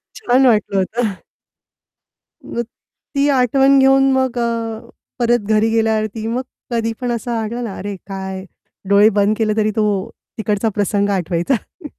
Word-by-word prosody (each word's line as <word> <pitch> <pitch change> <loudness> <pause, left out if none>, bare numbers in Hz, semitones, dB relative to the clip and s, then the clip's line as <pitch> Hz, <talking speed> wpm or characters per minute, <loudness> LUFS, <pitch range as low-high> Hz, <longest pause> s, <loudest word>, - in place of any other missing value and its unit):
छान 265 - +2
वाटलं 210 -4 +2
होतं. 205 +1 -1 1.3
मग 235 - -3 0.5
ती 280 +1 +3
आठवण 270 +1 +4
घेऊन 270 0 +5
मग 260 -2 0
अ, 230 -1 -2 0.4
परत 240 0 +3
घरी 220 +1 +3
गेल्यावरती 220 -1 0
मग 240 +3 -1 0.3
कधीपण 230 +2 -2
असं 235 +1 -3
आलं 235 +1 -3
ना, 210 -4 -5
अरे, 200 +1 -5
काय 190 -1 -6 0.4
डोळे 200 +2 +6
बंद 205 +1 +3
केले 215 -2 0
तरी 215 0 +2
तो 215 -2 +2 0.5
तिकडचा 215 0 0
प्रसंग 205 -1 +1
आठवायचा. 195 - -2
225 Hz, 135 wpm, -18 LUFS, 205-245 Hz, 1.3 s, डोळे